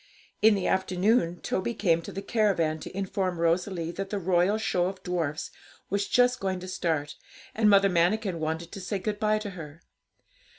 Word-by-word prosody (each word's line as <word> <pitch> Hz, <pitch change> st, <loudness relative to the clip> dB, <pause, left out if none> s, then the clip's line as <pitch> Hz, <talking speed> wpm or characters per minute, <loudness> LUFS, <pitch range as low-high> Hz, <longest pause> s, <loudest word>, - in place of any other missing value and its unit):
In 215 Hz, 0 st, +6 dB
the 195 Hz, -, -2 dB
afternoon 190 Hz, -1 st, +1 dB
Toby 225 Hz, +5 st, -2 dB
came 170 Hz, -5 st, +2 dB
to -, -, -8 dB
the 195 Hz, -, -6 dB
caravan 190 Hz, -8 st, +1 dB
to 185 Hz, -, -8 dB
inform 190 Hz, -2 st, -1 dB
Rosalie 170 Hz, 0 st, 0 dB
that 195 Hz, +2 st, -5 dB
the 205 Hz, -, -2 dB
'Royal 185 Hz, +2 st, +2 dB
Show 180 Hz, -5 st, 0 dB
of 190 Hz, 0 st, -7 dB
Dwarfs' 165 Hz, -4 st, -2 dB, 0.4 s
was 200 Hz, 0 st, 0 dB
just 250 Hz, +1 st, +3 dB
going 190 Hz, -1 st, -2 dB
to 185 Hz, -, -7 dB
start, 155 Hz, -5 st, -2 dB, 0.4 s
and 215 Hz, -1 st, +3 dB
Mother 200 Hz, -1 st, +6 dB
Manikin 180 Hz, +1 st, +1 dB
wanted 160 Hz, +2 st, -3 dB
to 195 Hz, -, -7 dB
say 195 Hz, +2 st, -2 dB
good 205 Hz, +2 st, -3 dB
bye 215 Hz, 0 st, +2 dB
to 215 Hz, -1 st, -5 dB
her. 160 Hz, -3 st, -10 dB
185 Hz, 180 wpm, -27 LUFS, 170-205 Hz, 0.4 s, In